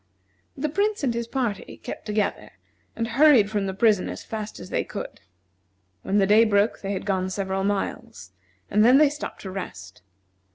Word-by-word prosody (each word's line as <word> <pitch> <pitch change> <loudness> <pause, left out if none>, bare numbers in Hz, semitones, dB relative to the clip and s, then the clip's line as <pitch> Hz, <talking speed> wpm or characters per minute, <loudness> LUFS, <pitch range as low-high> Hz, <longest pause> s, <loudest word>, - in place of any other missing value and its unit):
The 290 +3 -1
Prince 405 +4 0
and 250 -4 +1
his 235 0 -3
party 235 -6 -3
kept - - -8
together, 210 -1 -1 0.5
and 230 - -2
hurried 240 -4 +5
from 205 -2 -1
the 190 - -3
prison 210 -2 +3
as - - -7
fast 215 -1 -6
as - - -10
they - - 0
could. - - -8 0.8
When 195 - 0
the 195 - +4
day 210 +3 +6
broke 205 -1 +2
they 195 0 -3
had 190 - -4
gone 190 -2 0
several 190 0 -2
miles, 200 0 -3 0.4
and 210 - +4
then 250 +4 +7
they 300 0 +6
stopped 295 - -7
to 190 - -7
rest. 95 - -8
210 Hz, 180 wpm, -24 LUFS, 195-235 Hz, 0.8 s, then